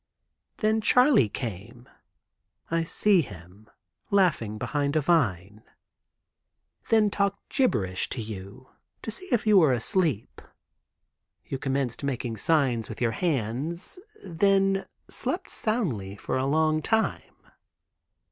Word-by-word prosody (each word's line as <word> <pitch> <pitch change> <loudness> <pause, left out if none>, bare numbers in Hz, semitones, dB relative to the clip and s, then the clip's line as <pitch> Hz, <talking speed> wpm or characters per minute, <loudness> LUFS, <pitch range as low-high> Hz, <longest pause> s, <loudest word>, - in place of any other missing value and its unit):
"Then 220 -1 +1
Charley 250 - +5
came." 115 +2 -7 0.8
(I 165 0 +1
see 195 +3 +3
him, 100 - -12 0.4
laughing 165 - +2
behind 145 +5 -1
a - - +4
vine); 105 - 0 1.3
"then 215 -2 +4
talked 200 0 -1
gibberish 100 - 0
to - - -4
you, 110 +3 -8 0.3
to 225 - -4
see 370 - -9
if 240 -3 +1
you 210 -2 +6
were 155 -6 +5
asleep. 130 - -1 1.0
You 135 - -5
commenced 135 -2 -2
making 125 -4 -3
signs 130 -4 +1
with 110 - -7
your 120 -2 +1
hands. 150 - -2 0.3
Then 195 +2 +2 0.2
slept - - -4
soundly 140 - -2
for 105 - -4
a 130 +1 0
long 155 +1 +2
time. 220 +7 -1
140 Hz, 115 wpm, -26 LUFS, -, 1.3 s, you